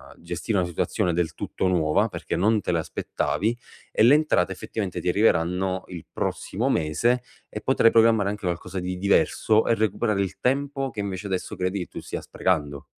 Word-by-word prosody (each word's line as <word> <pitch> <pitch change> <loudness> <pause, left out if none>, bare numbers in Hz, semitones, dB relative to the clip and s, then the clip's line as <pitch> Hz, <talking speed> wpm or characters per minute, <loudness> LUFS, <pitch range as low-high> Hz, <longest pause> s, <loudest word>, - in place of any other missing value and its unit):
ehm, - - -22
gestire 105 - -2
una 90 - +2
situazione 85 +1 -1
del 85 -1 -1
tutto 95 - -2
nuova, 80 -4 +2
perché - - -4
non 105 +3 +2
te - - -2
l'aspettavi, 90 +6 -1 0.4
e - - 0
le 125 +6 +7
entrate 150 - +2
effettivamente 95 0 -4
ti - - 0
arriveranno 90 -1 +1
il 85 -4 -8
prossimo - - -2
mese, 115 +12 +1 0.3
e 105 - -6
potrai 120 -2 +4
programmare 115 -3 +4
anche 105 -1 -5
qualcosa 90 +2 -3
di 90 0 -4
diverso 100 +3 +2
e 115 - +3
recuperare 105 -1 0
il 95 0 -4
tempo 135 +1 0
che 110 - -5
invece 100 0 -4
adesso 95 -2 -3
credi 90 +2 -1
che 90 - -3
tu - - -8
stia - - -5
sprecando. 75 -6 -1
95 Hz, 180 wpm, -25 LUFS, 90-110 Hz, 0.4 s, le